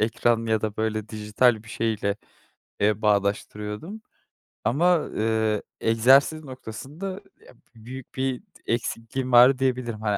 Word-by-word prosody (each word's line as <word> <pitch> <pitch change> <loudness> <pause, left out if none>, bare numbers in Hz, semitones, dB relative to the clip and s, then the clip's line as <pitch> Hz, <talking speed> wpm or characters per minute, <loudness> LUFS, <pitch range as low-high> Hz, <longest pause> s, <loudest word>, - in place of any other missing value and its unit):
ekran 115 +1 +1
ya 110 -1 +1
da 110 0 -3
böyle 110 -1 -2
dijital 110 +1 +1
bir 110 - -16
şeyle, 110 -3 -1 0.6
eee, 105 +1 +2
bağdaştırıyordum 105 - -1 0.6
ama, 165 +7 +2
eee, 110 -1 +1 0.2
egzersiz 135 +7 +4
noktasında, 135 - -7 0.4
ya - - -15 0.2
büyük 120 +3 -10
bir 130 -1 -1
d - - -36 0.3
eksikliğim 120 +2 -3
var 125 +2 +7
diyebilirim. 125 -4 -1
Hani, 105 -2 0
115 Hz, 125 wpm, -25 LUFS, 110-130 Hz, 0.6 s, var